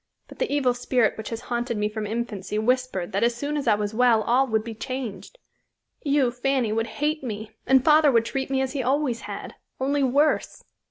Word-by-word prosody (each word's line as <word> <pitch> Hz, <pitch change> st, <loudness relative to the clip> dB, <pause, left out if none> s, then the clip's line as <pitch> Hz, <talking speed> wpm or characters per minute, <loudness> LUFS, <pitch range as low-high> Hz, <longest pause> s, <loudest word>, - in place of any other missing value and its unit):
But -, -, -14 dB
the -, -, -1 dB
evil 275 Hz, -4 st, +2 dB
spirit 245 Hz, -2 st, +1 dB
which 220 Hz, -, -6 dB
has 230 Hz, 0 st, -5 dB
haunted 240 Hz, -2 st, -2 dB
me 210 Hz, 0 st, +1 dB
from 210 Hz, 0 st, -4 dB
infancy 210 Hz, -3 st, -3 dB
whispered 245 Hz, -5 st, 0 dB
that 200 Hz, -, 0 dB
as 235 Hz, 0 st, +2 dB
soon 285 Hz, +5 st, -3 dB
as 285 Hz, -4 st, -2 dB
I 215 Hz, -, +5 dB
was 205 Hz, 0 st, -3 dB
well 230 Hz, -1 st, +4 dB
all 255 Hz, +4 st, +3 dB
would 220 Hz, -2 st, 0 dB
be 230 Hz, 0 st, -6 dB
changed. 230 Hz, -, -6 dB, 0.6 s
You, 280 Hz, -4 st, +2 dB
Fanny, 255 Hz, -2 st, 0 dB
would 225 Hz, +1 st, 0 dB, 0.2 s
hate 305 Hz, 0 st, 0 dB
me, 215 Hz, -3 st, -5 dB, 0.2 s
and 265 Hz, 0 st, +4 dB
father 305 Hz, -1 st, +6 dB
would 230 Hz, -2 st, +3 dB
treat 265 Hz, +2 st, -3 dB
me 265 Hz, -1 st, +1 dB
as 265 Hz, 0 st, -2 dB
he 280 Hz, -, -1 dB
always 260 Hz, -1 st, 0 dB
had, -, -, -6 dB, 0.3 s
only 280 Hz, +2 st, +1 dB
worse." 280 Hz, +3 st, +1 dB
245 Hz, 210 wpm, -25 LUFS, 220-270 Hz, 0.6 s, father